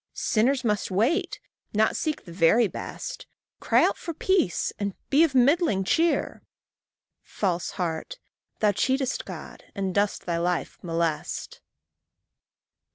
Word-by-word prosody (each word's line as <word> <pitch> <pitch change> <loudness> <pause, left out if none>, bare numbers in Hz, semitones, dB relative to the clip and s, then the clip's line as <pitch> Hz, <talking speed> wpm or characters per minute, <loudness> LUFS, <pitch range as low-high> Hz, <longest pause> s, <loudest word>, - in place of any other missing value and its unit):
Sinners 255 +4 +1
must 210 -3 0
wait, 225 - +1 0.4
not 220 +1 +3
seek 310 -1 -2
the 170 - -10
very 195 +7 +4
best, - - -7 0.3
Cry - - +3
out - - 0
for 335 - -5
peace, 360 - +1
and 200 -2 -2 0.2
be 290 +4 +6
of 300 -5 +1
middling 260 - +3
cheer: 330 - +1 0.8
False 180 -4 -2
heart! 175 - -3 0.4
thou 210 -1 +4
cheatest 265 +5 0
God, - - -9
and 195 -2 -2
dost 205 +1 0
thy 170 -1 -1
life 175 0 -2
molest. 165 -2 -3
210 Hz, 125 wpm, -26 LUFS, 180-275 Hz, 0.8 s, be